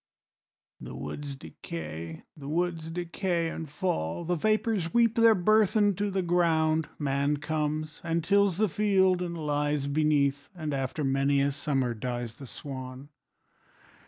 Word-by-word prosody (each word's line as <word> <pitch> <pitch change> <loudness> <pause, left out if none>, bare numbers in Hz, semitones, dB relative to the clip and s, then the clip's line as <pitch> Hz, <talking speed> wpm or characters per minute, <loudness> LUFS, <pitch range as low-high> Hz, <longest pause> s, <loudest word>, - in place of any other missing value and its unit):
<> - - -38
The - - -8
woods 145 -1 -5
decay, 80 - -7
the 140 -3 -9
woods 165 0 -1
decay 175 0 -1
and 160 -2 -6
fall, 145 - -2
The 175 - 0
vapors 215 -1 +1
weep 230 -2 +5
their 230 -1 +6
burthen 210 +1 +4
to 205 0 0
the 190 -1 -1
ground, 160 -2 +2
Man 140 0 0
comes 155 +1 -2
and 165 0 0
tills 200 0 +3
the 215 +1 +3
field 190 -1 +3
and 170 -1 -3
lies 150 -2 0
beneath, 145 -1 +1
And 155 -4 -3
after 135 +3 -2
many 135 +1 +2
a 140 +1 +2
summer 135 -3 -1
dies 120 0 -4
the 135 - -9
swan. 130 +2 -8
155 Hz, 145 wpm, -28 LUFS, 140-180 Hz, -, their